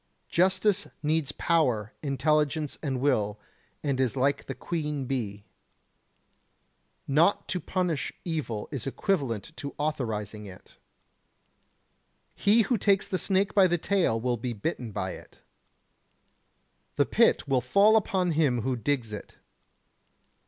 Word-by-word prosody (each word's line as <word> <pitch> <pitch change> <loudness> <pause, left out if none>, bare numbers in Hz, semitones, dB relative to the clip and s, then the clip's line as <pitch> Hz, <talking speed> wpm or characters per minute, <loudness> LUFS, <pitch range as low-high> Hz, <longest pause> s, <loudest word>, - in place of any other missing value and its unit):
Justice 190 +3 +2 0.2
needs 150 -1 +1
power, 130 - +1
intelligence 150 +1 0
and 135 -4 -2
will, 105 -6 +1 0.4
and 140 -3 0
is 130 -2 +1
like 140 +2 +1
the - - -4
Queen 150 -5 -3
Bee. 105 -6 -3 1.6
Not 160 +8 +3
to 185 - -1
punish 180 -2 -1
evil 150 -11 -3
is 135 -3 -4
equivalent 140 - -1
to 140 -1 -6
authorizing 110 -8 -3
it. 95 -1 -14 1.6
He 220 +3 +4
who 230 +1 0
takes 195 -1 +3
the 185 - -1
snake 195 0 +1
by 195 -3 +6
the 175 0 +1
tail 170 - +1
will 120 +1 0
be 120 +1 -3
bitten 115 +1 -4
by - - -3
it. - - -12 1.6
The - - +3
pit - - +3
will 135 -2 +2
fall 200 - +4
in 220 - +6
upon 185 -4 +1
him 145 -7 +2
who 130 +1 0
digs 120 -3 -2
it. 105 - -8
145 Hz, 130 wpm, -28 LUFS, 125-180 Hz, 1.6 s, by